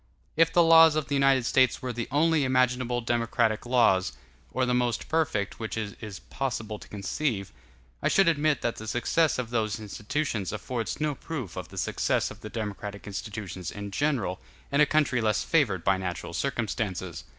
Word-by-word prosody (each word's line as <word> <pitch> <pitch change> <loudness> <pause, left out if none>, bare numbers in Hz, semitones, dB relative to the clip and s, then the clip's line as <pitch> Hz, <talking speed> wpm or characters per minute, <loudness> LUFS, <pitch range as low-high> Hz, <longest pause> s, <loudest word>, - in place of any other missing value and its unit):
If 165 0 +4
the 175 - +5
laws 165 -1 +7
of 155 -3 -1
the - - -1
United 135 -2 +3
States 130 0 +3
were 130 -2 -4
the 115 0 -4
only 155 +2 +3
imaginable 125 -1 +1
democratic 115 -1 0
laws, 95 - +3 0.4
or 130 - +1
the 125 - +1
most 120 -2 0
perfect 145 -11 0
which 110 0 -4
it 105 -2 -4
is 105 -4 -7
possible 110 -5 -4
to - - -13
conceive, 100 - -3 0.5
I - - +1
should 195 -2 +4
admit 155 -2 +2
that 120 - -1
the 110 - -7
success 150 +7 +1
of 120 -2 -4
those 110 -3 0
institutions 110 - -3
affords 120 -3 -4
no 150 -1 0
proof 135 - -6
of - - -5
the - - -13
success - - 0
of - - -12
democratic 105 -1 -5
institutions 100 -4 -5
in 100 -1 -7
general, 115 -7 -1 0.3
in 140 +1 +3
a 150 - +6
country 145 -5 +2
less 110 -1 +1
favored 115 - +1
by 95 +1 +3
natural 90 -2 -5
circumstances. 110 - -2
120 Hz, 175 wpm, -27 LUFS, 105-140 Hz, 0.5 s, laws